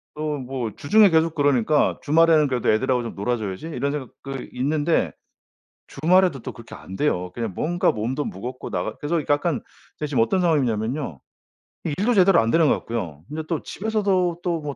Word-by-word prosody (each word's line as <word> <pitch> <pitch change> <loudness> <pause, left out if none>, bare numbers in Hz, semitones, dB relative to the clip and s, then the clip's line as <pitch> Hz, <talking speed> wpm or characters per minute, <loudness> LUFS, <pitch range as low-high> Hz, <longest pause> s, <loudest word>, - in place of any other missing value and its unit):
또 150 -1 -2
뭐 125 -3 -4
주중에 210 +6 +5
계속 160 -1 +2
그러니까 145 -1 +2
'주말에는 155 0 +4
그래도 125 -3 0
애들하고 125 +3 +1
좀 115 - -6
놀아줘야지.' 105 +3 -3
이런 140 -3 -2
생각 140 -5 -4
그 135 -2 -6
있는데 145 +5 0 0.8
주말에도 170 0 +2
또 - - -6
그렇게 115 - -12
안 95 - -10
돼요. 90 -11 0
그냥 115 -4 -3
뭔가 175 - +1
몸도 125 +7 -2
무겁고 125 +7 -6
나가 - - -3
그래서 160 +3 -1
약간 145 0 +1 0.4
제가 150 - -2
지금 130 -6 +2
어떤 185 +11 +1
상황이냐면요. 125 - 0 0.6
일도 195 +10 0
제대로 190 -3 +5
안 115 - +1
되는 165 -1 +4
것 - - +4
같고요. 90 -11 -5
근데 155 +1 -5
또 165 -3 -1
집에서도 195 -5 0
또 170 -3 -1
145 Hz, 385 characters per minute, -23 LUFS, 120-165 Hz, 0.8 s, 주중에